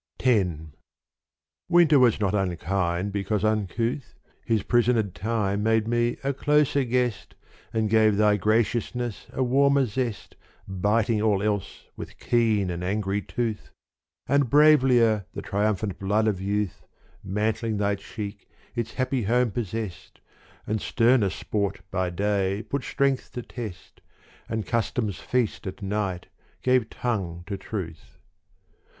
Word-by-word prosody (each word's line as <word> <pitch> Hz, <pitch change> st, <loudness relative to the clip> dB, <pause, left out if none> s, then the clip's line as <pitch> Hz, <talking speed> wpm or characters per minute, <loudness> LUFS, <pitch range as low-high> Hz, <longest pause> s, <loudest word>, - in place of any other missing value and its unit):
X 110 Hz, -8 st, +3 dB, 1.2 s
Winter 170 Hz, -4 st, +6 dB
was 120 Hz, -4 st, +4 dB
not 100 Hz, -2 st, 0 dB
unkind 95 Hz, 0 st, -1 dB
because 100 Hz, +1 st, -1 dB
uncouth, 110 Hz, +5 st, -1 dB, 0.3 s
His 110 Hz, -4 st, 0 dB
prisoned 115 Hz, -5 st, +2 dB
time 105 Hz, -2 st, -1 dB
made 110 Hz, 0 st, +2 dB
me 120 Hz, 0 st, +1 dB
a 140 Hz, +1 st, 0 dB
closer 145 Hz, 0 st, +2 dB
guest 125 Hz, -2 st, -1 dB, 0.4 s
And 110 Hz, -1 st, 0 dB
gave 110 Hz, -1 st, +4 dB
thy 105 Hz, 0 st, +4 dB
graciousness 115 Hz, +2 st, 0 dB
a 130 Hz, -, -1 dB
warmer 140 Hz, +2 st, +3 dB
zest 120 Hz, -1 st, -4 dB, 0.3 s
Biting 105 Hz, +3 st, +1 dB
all 105 Hz, -2 st, +2 dB
else 105 Hz, -3 st, -2 dB
with -, -, -9 dB
keen 110 Hz, -6 st, +1 dB
and 85 Hz, 0 st, -4 dB
angry 100 Hz, +1 st, -1 dB
tooth: 115 Hz, +3 st, -3 dB, 0.6 s
And 140 Hz, -3 st, +2 dB
bravelier 125 Hz, -8 st, +5 dB
the -, -, -5 dB
triumphant 100 Hz, -2 st, -1 dB
blood 105 Hz, +3 st, +1 dB
of 100 Hz, -4 st, 0 dB
youth 100 Hz, -1 st, -2 dB, 0.4 s
Mantling 110 Hz, +3 st, -1 dB
thy 100 Hz, 0 st, +1 dB
cheek 100 Hz, +1 st, -7 dB, 0.3 s
its 120 Hz, -1 st, -3 dB
happy 130 Hz, 0 st, 0 dB
home 120 Hz, +2 st, +2 dB
possest 110 Hz, -3 st, -5 dB, 0.5 s
And 110 Hz, 0 st, -2 dB
sterner 115 Hz, -3 st, +3 dB
sport 100 Hz, 0 st, -3 dB
by 95 Hz, -1 st, 0 dB
day 100 Hz, +2 st, 0 dB
put 140 Hz, +2 st, -3 dB
strength 135 Hz, -1 st, 0 dB
to 125 Hz, -, -5 dB
test 110 Hz, -8 st, -9 dB, 0.5 s
And 110 Hz, -1 st, -2 dB
custom's 110 Hz, -3 st, -1 dB
feast 125 Hz, -5 st, -1 dB
at 95 Hz, +2 st, -7 dB
night 95 Hz, -3 st, -2 dB, 0.4 s
gave 125 Hz, -3 st, +2 dB
tongue 95 Hz, -8 st, -3 dB
to 100 Hz, +1 st, -4 dB
truth. 95 Hz, -5 st, -7 dB
110 Hz, 130 wpm, -25 LUFS, 100-120 Hz, 1.2 s, Winter